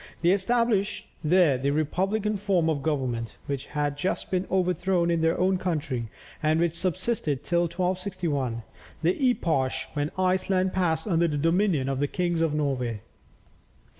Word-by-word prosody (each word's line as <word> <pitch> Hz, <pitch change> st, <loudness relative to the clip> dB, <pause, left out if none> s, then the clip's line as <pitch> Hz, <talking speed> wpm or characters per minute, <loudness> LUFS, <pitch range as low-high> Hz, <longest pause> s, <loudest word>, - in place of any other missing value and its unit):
They 170 Hz, -, +5 dB
established 210 Hz, +1 st, +1 dB, 0.2 s
there 155 Hz, -4 st, +4 dB
the 140 Hz, +2 st, 0 dB
republican 195 Hz, +8 st, 0 dB
form 185 Hz, -5 st, +1 dB
of 145 Hz, -3 st, -2 dB
government, 130 Hz, -7 st, -2 dB
which 140 Hz, -1 st, -4 dB
had 145 Hz, -1 st, -2 dB
just 185 Hz, -, -2 dB
been 185 Hz, 0 st, 0 dB
overthrown 180 Hz, -1 st, +1 dB
in 165 Hz, -1 st, +1 dB
their 165 Hz, 0 st, +2 dB
own 185 Hz, 0 st, +2 dB
country, 145 Hz, -10 st, -2 dB, 0.3 s
and 155 Hz, +1 st, +2 dB
which 170 Hz, -1 st, +1 dB
subsisted 170 Hz, -, -1 dB
till 175 Hz, -1 st, +1 dB
1261, 175 Hz, -, -2 dB, 0.4 s
the 180 Hz, -, +1 dB
epoch 140 Hz, -, +1 dB, 0.2 s
when 145 Hz, 0 st, -1 dB
Iceland 185 Hz, 0 st, +1 dB
passed 165 Hz, -4 st, 0 dB
under 170 Hz, -4 st, +2 dB
the 150 Hz, -2 st, -1 dB
dominion 165 Hz, -2 st, +2 dB
of 135 Hz, -1 st, -1 dB
the 145 Hz, -, +1 dB
kings 175 Hz, 0 st, -1 dB
of 165 Hz, -2 st, +2 dB
Norway. 130 Hz, -7 st, -1 dB
170 Hz, 150 wpm, -26 LUFS, 145-185 Hz, 0.4 s, They